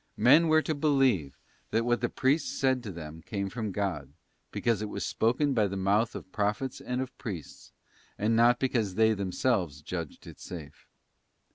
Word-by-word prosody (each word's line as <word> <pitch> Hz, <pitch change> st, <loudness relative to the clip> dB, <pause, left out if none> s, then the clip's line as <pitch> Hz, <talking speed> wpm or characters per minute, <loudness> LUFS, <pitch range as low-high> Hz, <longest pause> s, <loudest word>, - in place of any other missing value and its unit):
Men 155 Hz, +7 st, +6 dB
were 155 Hz, 0 st, +4 dB
to 155 Hz, -, -1 dB
believe 135 Hz, -, +2 dB, 0.3 s
that 115 Hz, +1 st, +1 dB
what 120 Hz, 0 st, +1 dB
the 120 Hz, -, 0 dB
priests 140 Hz, +5 st, 0 dB
said 130 Hz, -1 st, +2 dB
to 110 Hz, -4 st, -6 dB
them 80 Hz, -2 st, -8 dB
came 100 Hz, +2 st, -4 dB
from 110 Hz, -3 st, -3 dB
God, 90 Hz, -9 st, -3 dB, 0.4 s
because 115 Hz, -3 st, 0 dB
it 105 Hz, -, -3 dB
was -, -, -4 dB
spoken 130 Hz, +5 st, +1 dB
by 110 Hz, -4 st, +3 dB
the 100 Hz, 0 st, -4 dB
mouth 100 Hz, +4 st, +1 dB
of 95 Hz, -, -8 dB
pro 105 Hz, -1 st, +1 dB
phets 130 Hz, +3 st, -6 dB
and 125 Hz, +1 st, -2 dB
of 130 Hz, +1 st, -11 dB
priests, 95 Hz, -, -7 dB, 0.5 s
and 110 Hz, +2 st, +1 dB
not 120 Hz, +1 st, +5 dB
because 115 Hz, -8 st, 0 dB
they 110 Hz, 0 st, +4 dB
themselves 95 Hz, -, -1 dB
judged 85 Hz, -2 st, -6 dB
it -, -, -11 dB
safe. 80 Hz, -5 st, -10 dB
110 Hz, 180 wpm, -29 LUFS, 95-130 Hz, 0.5 s, Men